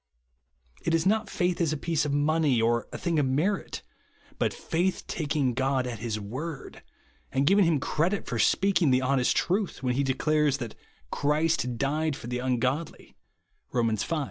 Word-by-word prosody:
It 165 - +1
is 165 - +1
not 215 +3 +2
faith 175 0 0
as 165 -3 +2
a 155 - -1
piece 160 0 0
of 145 - -1
money 145 -2 +2
or 115 +1 +1
a - - -5
thing 170 -3 0
of 140 - +2
merit; 160 +10 -1 0.6
but - - +1
faith 180 +3 -1
tak 155 -2 -3
ing 135 -5 +2
God 130 +1 0
at 120 -3 -5
his 110 -2 -3
word, 135 +9 -6 0.5
and 135 +1 +1
giving 195 +4 +5
him 165 -3 +2
credit 170 +8 0
for 115 - -3
speaking 185 - +3
the 130 0 +3
honest 130 -1 +2
truth, 190 -5 -1
when 125 -1 +1
he 135 - +1
de 130 -1 0
clares 150 -1 +2
that 120 -5 -6 0.2
" - - -35
Clirist 150 -4 +1
died 150 +3 0
for 135 - -10
the 125 +1 -3
ungodly," 130 +5 -2 0.6
(Rom. 115 -3 +1
V. 110 +10 -2
145 Hz, 185 wpm, -27 LUFS, 125-165 Hz, 0.6 s, giving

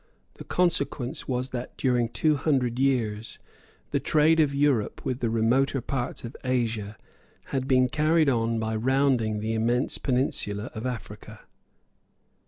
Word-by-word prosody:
The - - -7
consequence 145 -5 0
was 125 0 -2
that 125 -1 -6
during 125 -3 +1
two 155 +5 +2
hundred 130 -4 0
years 115 -5 0 0.5
the - - +1
trade 155 +2 +3
of 150 -3 +4
Europe 140 -6 0
with 125 -1 -2
the 120 - 0
remoter 120 +5 +2
parts 125 0 -4
of 115 - -8
Asia 115 -5 -1 0.6
had 135 -1 -1
been 130 -2 +4
carried 155 +3 +2
on 115 -3 +1
by 110 0 -2
rounding 120 -3 +1
the 110 +1 -2
immense 120 +3 0
peninsula 125 -5 -1
of 115 +2 -4
Africa. 125 -2 -7
125 Hz, 140 wpm, -26 LUFS, 115-135 Hz, 0.6 s, of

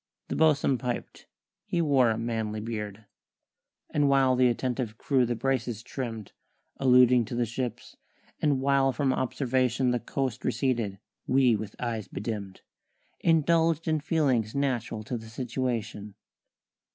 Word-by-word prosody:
The - - -2
bo'sun 145 -4 +3
piped 125 -2 -5 0.4
(he 175 - -2
wore 140 -7 +4
a 110 - 0
manly 110 -2 -2
beard); 105 -1 -5 0.9
And 145 -1 +2
while 135 -2 +4
th' 125 - 0
attentive 120 -2 -2
crew 130 -2 +2
the 120 - -1
braces 120 -2 -1
trimm'd 115 -5 -6 0.5
(Alluding 125 -2 +5
to 120 - -6
the 120 0 +1
ship's), 120 +1 -5 0.4
and 145 -3 +2
while 135 0 +3
from 135 0 0
observation 130 -1 0
The 125 - 0
coast 130 0 -3
receded, 115 -5 0 0.3
we 130 -3 +4
with 110 0 -6
eyes 115 -4 -3
be - - -7
dimm'd 105 -3 -5 0.6
Indulged 165 0 +2
in 155 -1 +2
feelings 140 -9 +1
natural 120 -5 -1
to 120 +2 -4
the 110 0 -11
situation. 115 -4 -3
125 Hz, 140 wpm, -28 LUFS, 115-135 Hz, 0.9 s, Alluding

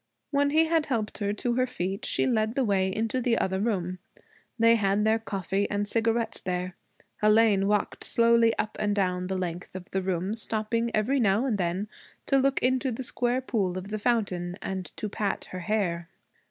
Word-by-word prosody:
When 285 0 +2
he 315 +3 +4
had 320 -1 +1
helped 225 -6 -2
her 205 -1 0
to 240 +3 -1
her 255 +1 +1
feet 195 -5 -3
she - - +1
led 220 -2 +1
the 270 - +2
way 195 -4 +2
into 225 +5 -1
the 235 -1 +2
other 190 0 0
room. 185 -4 -1 0.6
They 230 0 +5
had 205 -1 +1
their 220 +1 +3
coffee 195 -2 -2
and 205 0 -1
cigarettes 225 +1 0
there. 180 0 -3 0.5
Hélène 210 -2 +4
walked 210 0 0
slowly 230 -1 +4
up 215 - -2
and 205 -1 +1
down 180 -2 0
the 190 0 -2
length 180 0 -5
of 185 0 -8
the 190 - 0
room, 185 +1 -1
stopping 225 +1 -1
every 240 +6 +1
now 215 +2 +2
and 225 -6 0
then 180 +3 -1 0.4
to 275 - +3
look 275 +1 +1
into 260 +1 +2
the 245 +3 -4
square 245 +1 0
pool 200 -8 -1
of 185 +2 -6
the 215 0 -3
fountain 195 -6 0
and 190 -1 -4
to 215 - -3
pat 205 0 -2
her 185 - -5
hair. 180 -4 -1
215 Hz, 195 wpm, -27 LUFS, 190-235 Hz, 0.6 s, They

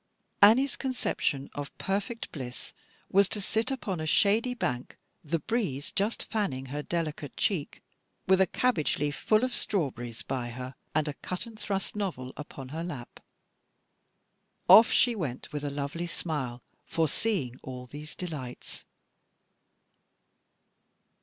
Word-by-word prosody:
Annie's 240 +7 +7
conception 230 - -1
of 145 -1 -6
perfect 205 +4 -2
bliss 125 -4 -7 0.4
was 195 0 +5
to 210 - 0
sit 220 +4 +1
upon 210 -10 -2
a 155 - -2
shady 225 +8 +4
bank, 125 - -2 0.3
"the 165 +2 0
breeze 160 - -1
just 205 +4 0
fanning 150 - -1
her 150 - -1
delicate 155 -3 -3
cheek," 175 -8 -1 0.4
with 190 0 +5
a 190 - +5
cabbage 245 -12 +2
leaf 145 0 0
full 215 +2 +3
of 255 -1 0
strawberries 120 - -1
by 125 -1 -2
her, 125 +2 -6 0.2
and 155 0 +3
a 150 - -1
cut 180 +8 -4
and 225 -2 -11
thrust 195 -1 -2
novel 165 -11 -3
upon 135 -3 -8
her 160 +4 -4
lap. 140 -9 -7 1.5
Off 225 +2 +10
she 245 - +5
went 150 - -4
with 150 -1 -3
a 145 - -1
lovely 145 +5 -3
smile, 135 -8 -3 0.2
foreseeing 160 - 0
all 125 -1 -7
these 150 +4 -9
delights. 145 -9 -6
160 Hz, 135 wpm, -29 LUFS, 135-205 Hz, 1.5 s, Off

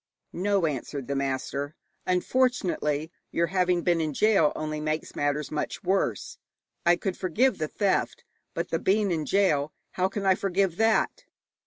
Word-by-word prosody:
'No,' 195 0 +1
answered 140 -2 -3
the 140 - -2
master, 140 +2 -2 0.3
'unfortunately, 180 - +1 0.2
your 170 - +2
having 180 0 +1
been 170 -2 +2
in 155 -2 -1
gaol 210 -8 +4
only 155 0 -3
makes 155 +1 -3
matters 145 0 -1
much 155 +6 -3
worse. 180 - -1 0.5
I 175 - +7
could 185 +1 -3
forgive 210 +6 +1
the 155 - -1
theft, 200 +4 0 0.3
but - - -2
the - - 0
being 200 0 +2
in 160 -3 -1
gaol 155 -7 +2 0.2
how 185 +1 0
can 195 0 -4
I 190 - +6
forgive 190 -2 0
that?' 225 0 +2
175 Hz, 155 wpm, -27 LUFS, 150-195 Hz, 0.5 s, I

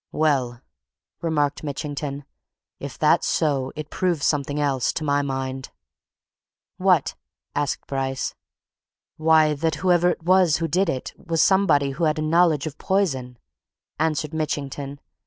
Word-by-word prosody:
"Well," 130 -6 0 0.6
remarked 150 -4 0
Mitchington, 145 0 -4 0.5
"if - - -7
that's - - +3
so, 140 -4 0
it 155 0 -7
proves 175 -6 0
something 145 0 0
else 135 -4 +1
to 155 - -3
my 145 -1 +2
mind." 135 -1 -4 1.1
"What!" - - +3 0.4
asked 145 -1 -2
Bryce. 135 -1 -2 0.8
"Why, 155 -1 +4
that 155 +2 -1
whoever 175 -1 +4
it 175 - -3
was 180 -3 +4
who 165 0 -1
did 180 +3 +1
it 130 -5 -3
was 165 -1 +2
somebody 155 -8 +3
who 165 +5 -1
had 155 0 +1
a 155 - -1
knowledge 165 -2 +3
of 150 -2 -7
poison!" 135 -11 -1 0.6
answered 155 -1 0
Mitchington. 145 -2 -3
150 Hz, 135 wpm, -23 LUFS, 140-160 Hz, 1.1 s, Why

